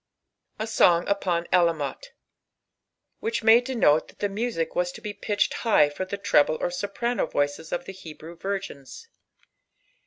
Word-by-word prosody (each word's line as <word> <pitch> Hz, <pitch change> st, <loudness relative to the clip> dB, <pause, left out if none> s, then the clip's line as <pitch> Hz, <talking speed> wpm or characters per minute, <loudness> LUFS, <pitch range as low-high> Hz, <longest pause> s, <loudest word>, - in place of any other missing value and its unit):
A 220 Hz, -, -3 dB
Song 175 Hz, -6 st, +3 dB
upon 180 Hz, -4 st, 0 dB
Alamolb. 170 Hz, -, +1 dB, 1.2 s
Which 445 Hz, -, -2 dB
may 225 Hz, +2 st, +7 dB
denote 230 Hz, -, +2 dB
Uiai -, -, -11 dB
Ike 205 Hz, -, 0 dB
music 210 Hz, -6 st, -2 dB
teas 180 Hz, 0 st, 0 dB
to -, -, -10 dB
be 210 Hz, -, -6 dB
pitched 205 Hz, 0 st, 0 dB
high 205 Hz, -11 st, +4 dB
for 145 Hz, +6 st, -5 dB
the 200 Hz, +2 st, -5 dB
trejiti 155 Hz, -5 st, +2 dB
or -, -, -1 dB
st^rano 205 Hz, +7 st, -2 dB
voices 145 Hz, +3 st, -1 dB
qf 175 Hz, 0 st, -3 dB
the 195 Hz, -, -7 dB
Hdirevi 165 Hz, -2 st, -11 dB
virgins. 195 Hz, -, -6 dB
185 Hz, 150 wpm, -25 LUFS, 165-210 Hz, 1.2 s, may